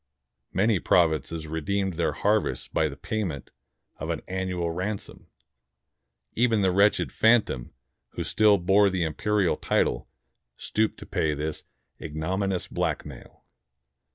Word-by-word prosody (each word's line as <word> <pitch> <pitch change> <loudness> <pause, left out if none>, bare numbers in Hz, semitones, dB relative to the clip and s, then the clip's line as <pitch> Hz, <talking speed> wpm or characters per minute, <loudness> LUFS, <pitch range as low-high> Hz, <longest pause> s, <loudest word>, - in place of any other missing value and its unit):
Many 105 0 +2
prov 85 -2 +4
inces 80 +2 -4
redeemed 95 +5 -1
their 85 0 0
harvests 105 +1 0
by 80 -1 0
the 70 - -9
payment 90 - -4 0.5
of - - -5
an - - -3
annual 90 -2 -2
ransom. 95 +4 -5 1.1
Even 115 -2 +2
the 95 - +3
wretched 100 +3 +3
phantom 110 - +2 0.4
who - - -3
still 105 -2 +4
bore 100 +3 +4
the 95 -2 -1
imperial 95 +4 0
title - - 0 0.5
stooped 110 0 -1
to - - -8
pay 75 -1 0
this 75 +1 -4 0.4
ignominious 90 +5 -2
blackmail. - - -4
95 Hz, 125 wpm, -26 LUFS, 80-105 Hz, 1.1 s, prov